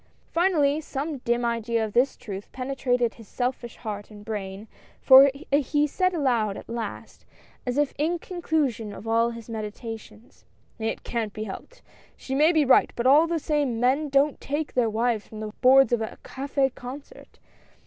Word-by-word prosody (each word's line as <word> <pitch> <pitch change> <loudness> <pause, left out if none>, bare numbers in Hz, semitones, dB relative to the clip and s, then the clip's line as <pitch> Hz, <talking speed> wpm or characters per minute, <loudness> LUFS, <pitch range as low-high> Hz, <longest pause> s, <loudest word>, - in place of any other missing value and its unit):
Finally, 315 -4 +2
some 290 0 -4
dim 240 0 0
idea 230 -1 0
of 210 - -8
this 255 +3 +2
truth 200 -2 -8
penetrated 255 -2 -1
his 225 -3 -15
selfish 245 0 -3
heart 205 -3 -6
and 210 -1 -13
brain, 205 -1 -5 0.3
for 270 +1 +8 0.2
he 290 +1 +2
said 370 +5 +1
aloud 235 -9 +1
at - - -10
last, 230 -1 -6 0.4
as 250 +2 -1
if 295 -1 +1
in 330 +4 +1
conclusion 300 - -2
of 215 - -10
all 230 +1 +3
his 230 -2 -9
meditations; 220 0 -8 0.2
" - - -37
It - - -5
can't 225 -4 -3
be 215 - -5
helped. 345 - -9 0.3
She 265 - -6
may 300 +5 +5
be 310 -4 +3
right, 265 - +5
but 235 - -3
all 295 +5 +6
the 335 0 0
same, 290 -6 -1
men 270 +5 +2
don't 275 +1 +2
take 290 +2 -3
their 240 -3 +2
wives 225 0 0
from 215 - -10
the 215 -1 -6
boards 265 0 +6
of 235 - +2
a 220 - -5
cafS 270 -1 -1
concert 280 - -10
250 Hz, 175 wpm, -25 LUFS, 225-285 Hz, 0.4 s, for